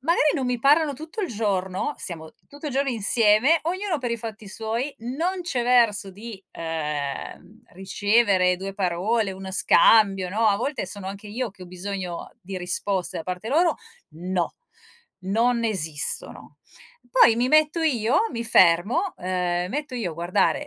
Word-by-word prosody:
magari 305 +1 +3
non 265 -4 -1
mi 250 -1 -1
parlano 290 +3 +3
tutto 315 - -7
il 375 - -2
giorno, 195 +2 -1
siamo 160 -3 -7 0.2
tutto 290 +2 -9
il 290 - -3
giorno 275 +1 0
insieme, 230 +6 +3
ognuno 365 0 -2
per 245 -3 -3
i 235 - -1
fatti 220 -2 -8
suoi, 230 +7 -3
non 330 +11 -3
c'è 265 -9 -1
verso 230 -5 +3
di, 205 0 -10
ehm, 155 +5 -5
ricevere 195 -1 +2
2 195 +1 -6
parole, 195 +4 0
uno 190 0 -8
scambio, 195 -2 +4
no, 220 +3 +2
a 200 - +3
volte 275 +6 -3
sono 200 -2 -6
anche 200 +2 -7
io 235 +2 -3
che 185 - -14
ho - - -9
bisogno 185 -1 -6
di 185 0 -6
risposte 180 +1 -2
da - - -5
parte 180 +5 -5
loro, 330 +4 +2 0.4
no, 180 +1 -2 0.7
non 230 +5 +1
esistono. 160 -9 -3 0.5
Poi 240 - +6
mi 245 +2 +1
metto 310 +2 +3
io, 250 -5 +2
mi 235 -1 -3
fermo, 195 - +3
ehm, 180 0 -2
metto 290 -2 -4
io 225 -8 -2
a 160 - -9
guardare 180 - 0
215 Hz, 160 wpm, -24 LUFS, 185-255 Hz, 0.7 s, Poi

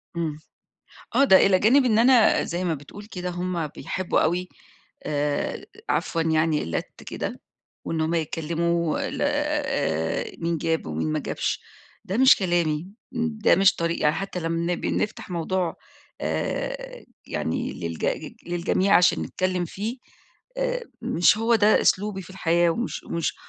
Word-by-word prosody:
إمم. 160 -3 -2 0.8
آه، 275 - +5
ده 190 -8 +7
إلى 190 -1 +4
جانب 255 +8 +5
إن 225 -3 +3
أنا 240 -1 +5
زي 175 +2 -3
ما 170 -3 +1
بتقول 150 +9 -10
كده 180 -3 -5
هم 175 -2 -2
بيحبّوا 180 +4 -2
أوي 180 +2 0 0.6
آآ 145 -1 -1 0.2
عفوًا 165 - 0
يعني 160 -1 +2
اللت 85 - -5
كده - - -5 0.4
وإن 165 - -2
هم 160 +2 0
يتكلِّموا 165 +1 0
ل - - -6
آآ 80 +1 -1
مين 170 -1 -1
جاب 160 - -1
ومين 80 0 -2
ما - - 0
جابش، - - -2 0.4
ده 190 - -3
مش 260 +2 +7
كلامي، 175 -3 0 0.2
ده 235 -3 +2
مش 195 0 +5
طريقي. 170 0 -2
يعني 150 +1 +3
حتّى 195 -1 -4
لمّا 165 +1 -1
بنفتح 210 +1 -2
موضوع 175 +1 -1 0.4
آآ - - -3 0.2
يعني - - -2
للجج 85 -2 -3
للجميع 175 +2 +2
عشان 180 - +4
نتكلِّم 185 -1 -1
فيه، 210 +8 -4 0.6
آآ - - -1 0.2
مش 175 +5 +3
هو 230 +1 +3
ده 215 0 +5
أسلوبي 195 0 +1
في 185 - -13
الحياة 175 -2 +2
ومش 235 +8 -3
ومش 170 -1 -2
175 Hz, 145 wpm, -25 LUFS, 165-205 Hz, 0.8 s, ده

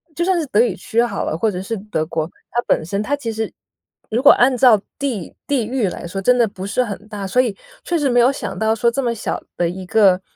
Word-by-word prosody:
就 345 - 0
算 370 -1 +2
是 315 - -1
德 215 - +1
语 240 - +3
区 230 - 0
好 205 -5 -2
了， 160 - -2
或 220 +5 +1
者 185 -1 -4
是 225 +4 -3
德 195 -6 -3
国， 160 -1 -2 0.2
它 240 - +1
本 - - +2
身 200 +4 -2
它 285 - 0
其 245 -6 -4
实 220 0 -3 0.6
如 235 +3 0
果 285 - +9
按 255 +1 +4
照 230 -5 +6 0.2
地 245 -11 -3
地 265 -6 +1
域 245 -5 0
来 175 - -7
说 195 +2 -4
真 250 +5 +4
的 235 -2 +4
不 190 -2 -8
是 230 +5 +1
很 210 -1 -7
大， 205 -2 -6
所 250 +7 +3
以 225 -6 -2 0.3
确 345 - 0
实 285 -3 +1
没 245 0 +3
有 245 +3 +5
想 195 -9 -5
到 220 +1 +2
说 235 +1 +2
这 275 - -1
么 235 - 0
小 225 - -4 0.2
的 175 - +1
一 185 +1 -7
个 190 -2 +4
225 Hz, 285 characters per minute, -19 LUFS, 195-250 Hz, 0.6 s, 果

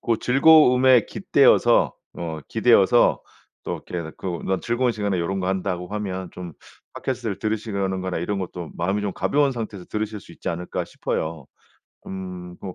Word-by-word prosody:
고 115 -2 +1
즐거움에 130 -3 +6
깃대어서 - - +3 0.2
어 80 -2 -5
기대어서 115 0 +4 0.4
또 - - -4
이렇게 85 -3 -4
그 - - -8 0.2
'나도 95 0 0
즐거운 120 +1 0
시간에 100 -4 -1
요런 95 +3 -1
거 90 - -1
한다.'고 90 -2 -2
하면 95 -3 -4
좀 90 -2 -8 0.4
팟캐스트를 120 -7 -3
들으시려는 100 -3 -2
거나 95 -1 -3
이런 100 +4 -2
것도 90 -3 -6
마음이 95 +4 -1
좀 100 -2 -2
가벼운 140 +5 +1
상태에서 110 -6 -6
들으실 110 0 -3
수 - - -15
있지 - - -6
않을까 85 +1 -3
싶어요. 80 -3 -4 0.6
음 90 -2 -7
뭐 95 -2 -7
95 Hz, 365 characters per minute, -23 LUFS, 90-115 Hz, 0.6 s, 즐거움에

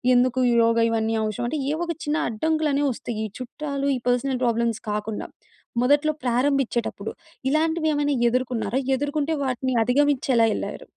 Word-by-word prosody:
ఎందుకు 255 +1 +3
ఈ - - +3
యోగా, 230 0 +3
ఇవన్నీ 225 0 0
అవసరమంటే, 240 +7 -2
ఏవొక 335 +2 -2
చిన్న 300 +1 0
అడ్డంకులనేవొస్తయి, 285 -2 0
ఈ - - -2
చుట్టాలు, 280 +2 -4
ఈ - - -1
పర్సనల్ 250 +1 +1
ప్రాబ్లమ్స్ 235 -1 +1
కాకుండా, 210 +1 -3 0.6
మొదట్లో 290 +4 +3
ప్రారంభించేటప్పుడు, 245 -4 0 0.4
ఇలాంటివే 315 +1 +1
ఏమైనా 290 -1 +1
ఎదుర్కున్నారా? 250 0 -1 0.2
ఎదుర్కొంటే 290 +3 -1
వాటిని 260 0 -1
అధిగమిచ్చెలా 255 -3 +3
యెళ్ళారు? - - -5
260 Hz, 125 wpm, -24 LUFS, 235-290 Hz, 0.6 s, ఎందుకు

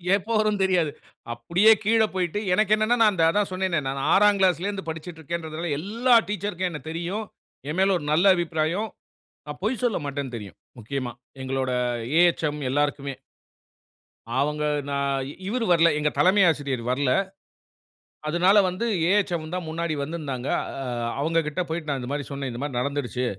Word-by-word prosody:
எப்போ 205 +3 -4
வரும்னு 210 -2 +1
தெரியாது. 175 -5 +1 0.4
அப்படியே 170 - +4
கீழ 225 +2 +3
போய்ட்டு 180 +1 -1
எனக்கு 215 +2 +3
என்னன்னா, 215 +3 +1
நான் 210 -5 +3
அதான் 205 +4 +1
சொன்னேனே, 185 -3 0
நான் 135 +1 -3
6ஆம் 205 0 +5
கிளாஸ்ல 185 0 +2
இருந்து 200 -4 -4
படிச்சுக்கிட்டு 160 +1 -7
இருக்கிறேன்றதுல 165 +1 -4
எல்லா 230 +8 +1 0.2
டீச்சர்க்கும் 190 -2 -2
என்ன 150 - -6
தெரியும். 175 +7 -3 0.5
எமேல 190 +3 +2
ஒரு 150 - -7
நல்ல 165 +5 +3
அபிப்பிராயம். 170 +5 -1 0.6
நான் 150 +2 -8
பொய் 220 +2 -1
சொல்லமாட்டேன்னு 145 - -2
தெரியும். 100 -5 -10 0.2
முக்கியமா, 125 +2 -4 0.3
எங்களோட 130 0 -2 0.5
ஏஹச்ம் 155 -4 +1
எல்லாருக்குமே. 140 0 -1 1.3
அவங்க 150 +2 0 0.3
நான் 140 -1 -1 0.2
இவரு 230 +3 -1
வரல. 170 -1 +5
எங்க 150 0 +1
தலைமை 190 +3 +5
ஆசிரியர் 140 -6 -2
வரல 130 0 +1 1.2
அதனால 175 +5 +3
வந்து 185 +6 -3 0.3
ஏஹச்ம் 175 -6 0
தான் 180 -2 -4
முன்னாடி 165 0 -2
வந்திருந்தாங்க. 140 -4 -4 0.3
அ - - -5 0.4
அவங்ககிட்ட 160 +1 0
போய்ட்டு 160 -1 -4
நான் 140 -2 -1
இந்த 125 +1 -6
மாரி 145 0 -2
சொன்னேன். 140 -2 -4
இந்த 120 - -6
மாரி 140 -4 -2
நடந்துருச்சு. 130 -2 -2
165 Hz, 145 wpm, -25 LUFS, 140-190 Hz, 1.3 s, 6ஆம்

